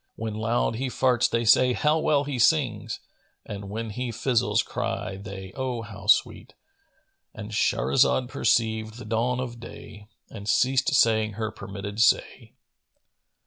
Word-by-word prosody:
When 110 -1 -4
loud 110 +1 0
he 130 +2 -2
farts 125 -1 +2
they 115 0 0
say 125 +3 +5
'How 150 +5 +2
well 145 -2 +2
he 140 -3 -4
sings!' 120 - +1 0.2
* - - -43
And 100 -1 -7
when 110 +1 -4
he 125 +3 -4
fizzles[FN#452] 120 +1 +1
cry 95 - -4
they, 95 -1 -9
'Oh, 125 -3 -3
how 105 -3 -10
sweet!'" 110 - +2 0.8
—And 110 0 -8
Shahrazad 65 - +2
perceived 110 -1 0
the 120 - -9
dawn 115 +3 0
of 120 -2 -5
day 105 -2 -11 0.2
and 105 -1 -8
ceased 130 +6 +2
saying 110 -4 +3
her 110 +1 -3
permitted 100 -1 -7
say. - - +1
115 Hz, 145 wpm, -25 LUFS, 105-125 Hz, 0.8 s, say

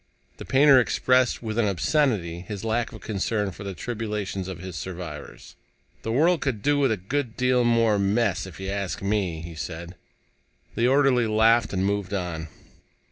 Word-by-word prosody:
The - - -8
painter 135 0 +6
expressed 125 0 +2
with 110 0 -2
an 110 - +3
obscenity 100 - +1
his 100 +3 -7
lack 115 +1 0
of - - -11
concern 105 0 -1
for 90 - -10
the 100 -2 -5
tribulations 105 -3 -4
of 95 -3 -6
his 90 0 -8
survivors. 85 -4 -8 0.5
"The 115 - -3
world 160 +7 +3
could 120 -7 -2
do 145 0 +2
with 135 -4 +3
a 110 - 0
good 120 +5 -3
deal 125 -1 +3
more 115 -3 +3
mess, 100 -1 +1
if 90 -3 -11
you 95 0 -5
ask 100 -1 -3
me," 100 -5 -1
he 85 0 -8
said. 85 +2 -6 0.8
The 120 - +1
orderly 130 -3 +3
laughed 110 +2 +3
and 95 -1 0
moved 100 -1 -1
on. 85 -4 -4
105 Hz, 175 wpm, -25 LUFS, 95-120 Hz, 0.8 s, painter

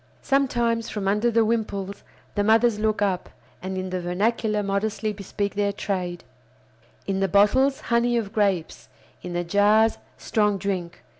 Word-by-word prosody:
Sometimes, 240 -4 +1
from 205 -2 -3
under 210 +4 +2
the 230 -1 +3
wimples, 200 -3 -2 0.3
the 205 - 0
mothers 220 +1 +3
look 215 -1 +1
up, 190 -3 -1 0.3
and 190 0 -4
in 185 0 -4
the 185 -1 -2
vernacular 210 +4 0
modestly 210 +2 -1
bespeak 200 0 -4
their 205 0 0
trade: 180 -4 -3 0.8
in 195 -1 -1
the 195 - +2
bottles 255 +8 +3
"honey 240 0 +1
of 215 -3 -3
grapes," 195 -6 -1 0.3
in 180 - -6
the 175 0 -1
jars 205 +5 +3 0.2
"strong 210 -2 +1
drink." 185 -3 -4
205 Hz, 150 wpm, -24 LUFS, 195-225 Hz, 0.8 s, the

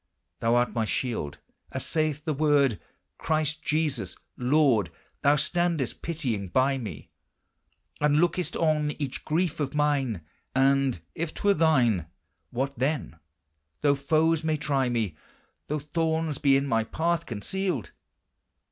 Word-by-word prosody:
Thou 115 +1 +2
art 120 0 +2
my 115 - +1
shield, 110 - -2 0.3
as - - -2
saith 155 -1 -1
the 155 - 0
Word. 140 - +3 0.4
Christ 155 -1 0
Jesus, 145 - -1 0.2
Lord, 125 - +3 0.3
Thou 145 +1 +5
standest 165 -2 0
pitying 125 - -2
by 130 +7 +2
me, 100 - -7 0.9
And 150 0 +3
lookest 175 +3 +1
on 150 -2 +1
each 140 -3 -4
grief 165 +1 0
of 145 -1 -2
mine 140 - +1 0.3
And 135 -6 +3
if 165 -1 -4
't - - -8
were 205 0 +5
thine: 125 - +3 0.4
What, 135 +3 -3
then, 135 - -1 0.6
though 145 -1 +4
foes 155 +3 +2
may 155 -1 +1
try 140 -4 +1
me. 110 -9 -1 0.5
Though 150 - -1
thorns 160 0 -1
be 140 -2 +5
in 140 - 0
my 115 -5 +1
path 165 +8 -1
concealed? 135 - -2
145 Hz, 135 wpm, -27 LUFS, 125-155 Hz, 0.9 s, Thou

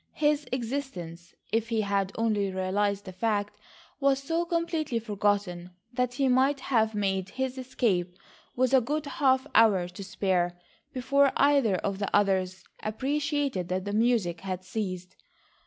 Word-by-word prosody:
His 295 -1 +1
existence, 225 -10 -5 0.2
if 225 +1 0
he 225 -2 +1
had 200 -2 0
only 215 -3 +1
realised 200 +2 -1
the 185 - -7
fact, 205 +1 -1 0.4
was 275 -1 +3
so 330 +4 0
completely 335 -6 -1
forgotten 205 -5 -1 0.2
that 250 0 -1
he 270 +1 +2
might 265 +2 +3
have 220 -4 +1
made 190 -2 -1
his 260 +3 -3
escape 200 -9 -1 0.4
with 255 +1 +1
a 265 - +6
good 300 +5 -2
half 265 -2 +2
hour 205 -6 +5
to 180 +3 -9
spare 180 -2 0 0.3
before 270 +2 +3
either 275 -8 +4
of 195 +2 -2
the 200 - -1
others 190 -2 +1 0.2
appreciated 280 - -1
that 185 +1 -2
the 205 - -3
music 215 -7 +1
had 185 -1 -4
ceased. 185 -2 -4
215 Hz, 145 wpm, -28 LUFS, 190-265 Hz, 0.4 s, a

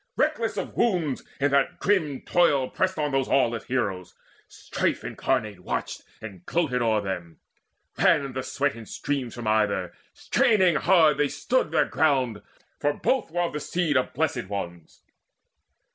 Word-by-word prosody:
Reckless - - 0
of - - -4
wounds, 175 - +1 0.2
in 145 0 +2
that 140 -1 +2
grim 160 -9 0
toil 145 -7 +2
pressed 185 -1 0
on 150 -1 -1
Those 135 -1 +1
aweless 120 -4 +1
heroes: 100 -8 -2 0.3
Strife - - -2
incarnate 110 -7 -2
watched 90 - -4 0.2
And 95 -5 -9
gloated 140 - 0
o'er 110 -2 +2
them. 90 -4 -6 0.6
Ran 135 -2 +3
the 130 - -3
sweat 140 +2 -1
in 115 -2 -10
streams 135 -5 -3
From 120 -1 -7
either: 105 -5 +1 0.2
straining 185 -8 +2
hard 160 -3 +4
they 145 - +3
stood 250 - 0
their 160 - +2
ground, 130 -8 +1 0.4
For 145 0 +1
both 260 - 0
were 175 +2 -1
of 170 - -2
the 150 - -2
seed 165 -1 -1
of 130 - 0
Blessed - - -1
Ones. 85 -5 -7
135 Hz, 155 wpm, -25 LUFS, 110-155 Hz, 0.6 s, hard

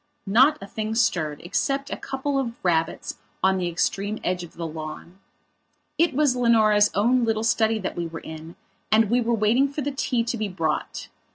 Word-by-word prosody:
Not 260 +10 +5
a - - -8
thing 215 +2 -4
stirred, 155 -10 0
except 275 +10 -1
a - - -1
couple 275 +1 -2
of 235 -3 -3
rabbits 165 -2 -1 0.2
on 190 0 +3
the 180 - -1
extreme 200 +5 -1
edge 180 0 -1
of 175 - -11
the 170 - -5
lawn. 160 +3 -8 0.8
It 335 -4 +3
was 290 -3 +3
Leonora's 215 -4 +4
own 240 +5 +3
little 225 -1 0
study 225 0 +2
that 190 - -4
we 170 -1 -3
were 165 0 -8
in 160 +1 -9 0.4
and 215 -1 +4
we 245 +1 +3
were 235 0 +1
waiting 225 +6 +3
for 295 - -4
the 285 +1 -2
tea 255 -3 0
to 235 +1 -3
be 215 -1 -2
brought. 165 -5 -3
215 Hz, 190 wpm, -24 LUFS, 175-245 Hz, 0.8 s, Not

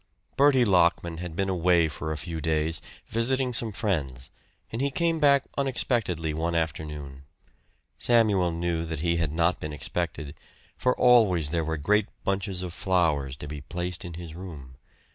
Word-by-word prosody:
Bertie 135 -3 +5
Lockman 85 -3 +2
had 85 -1 -6
been 95 +2 0
away 90 -2 +3
for 80 +1 -5
a 80 - -3
few 80 +1 -5
days, 80 +1 0 0.2
visiting 125 +3 0
some 115 -1 +4
friends, 75 - -2 0.4
and 115 - -3
he 140 - +1
came 165 +3 0
back 140 -2 +4 0.2
unexpectedly 115 - 0
one 85 +2 -1
afternoon. 75 -4 -4 0.7
Samuel 105 -7 +3
knew 85 0 -2
that 80 -2 -5
he 85 0 +1
had 80 -3 0
not 85 +3 +1
been 75 0 -5
expected, 75 -1 -3 0.4
for 125 0 0
always 100 -11 +4
there 85 -1 0
were 80 0 -2
great 105 +7 +2 0.2
bunches 95 -1 -1
of 90 -2 -6
flowers 80 -9 0
to 75 - -8
be 75 -1 -6
placed 90 +4 -4
in 85 -2 -7
his 85 -2 -8
room. 75 -8 -10
85 Hz, 160 wpm, -26 LUFS, 80-105 Hz, 0.7 s, Bertie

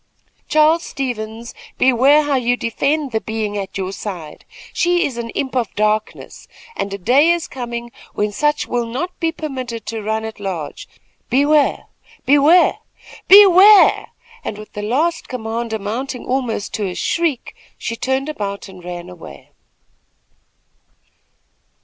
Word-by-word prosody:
"Charles 310 +2 +4
Stevens, 235 -5 -5 0.2
beware 265 +4 +4
how 290 -1 -1
you 245 -1 +1
defend 275 +5 -1
the 220 -1 -1
being 220 -2 -3
at 195 -1 -5
your 190 -1 -3
side. 180 -7 -8 0.3
She 350 0 +2
is 265 - -4
an 235 -1 -5
imp 265 -2 -3
of 240 -4 -1
darkness, 215 +1 -2 0.3
and 200 - -3
a 200 - -4
day 255 - +3
is 345 -1 +1
coming 240 -2 -6 0.2
when 210 0 0
such 295 +7 0
will 240 -1 -2
not 300 +11 -5
be 330 -1 0
permitted 260 -8 -6
to 225 0 -4
run 220 +1 -2
at 220 -1 -8
large. 185 -7 -5 0.4
Beware! 290 +3 +2 0.4
beware! 290 +6 +5 0.5
BEWARE!" 400 +1 +7 0.4
and 205 - -5
with 215 0 -12
the 210 - -5
last 290 +11 -1
command 230 -1 -4
amounting 230 +5 -4
almost 245 -5 -2
to 210 -2 -2
a 180 - -5
shriek, 330 -7 -1 0.2
she 230 - -4
turned 265 +3 -1
about 200 -10 -5
and 185 -2 -13
ran 175 0 -7
away. 165 - -12
240 Hz, 140 wpm, -19 LUFS, 210-290 Hz, 0.5 s, BEWARE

